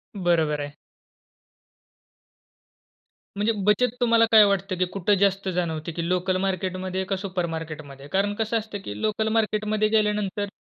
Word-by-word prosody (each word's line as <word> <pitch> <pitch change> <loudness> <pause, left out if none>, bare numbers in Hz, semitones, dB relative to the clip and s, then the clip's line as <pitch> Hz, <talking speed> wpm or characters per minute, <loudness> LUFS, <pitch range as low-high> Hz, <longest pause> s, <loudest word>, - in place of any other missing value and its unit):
बरोबर 165 -5 +1
आहे. 145 0 -6 2.6
म्हणजे 210 +3 +2
बचत 220 +4 +3
तुम्हाला 230 -1 +5
काय 220 -1 +9
वाटतं 195 -1 0
की 185 - +2
कुठे 200 +1 +2
जास्त 195 -1 +1
जाणवते 165 -2 -2
ती 170 0 -2
लोकल 185 +1 +1
मार्केटमध्ये 185 0 -2
का - - +3
सुपरमार्केटमध्ये? 165 -7 -5
कारण 195 +5 0
कसं 225 +1 0
असतं 215 -2 -5
की 105 0 -6
लोकल 215 0 0
मार्केटमध्ये 215 -1 +1
गेल्यानंतर 210 -2 0
195 Hz, 130 wpm, -25 LUFS, 175-210 Hz, 2.6 s, काय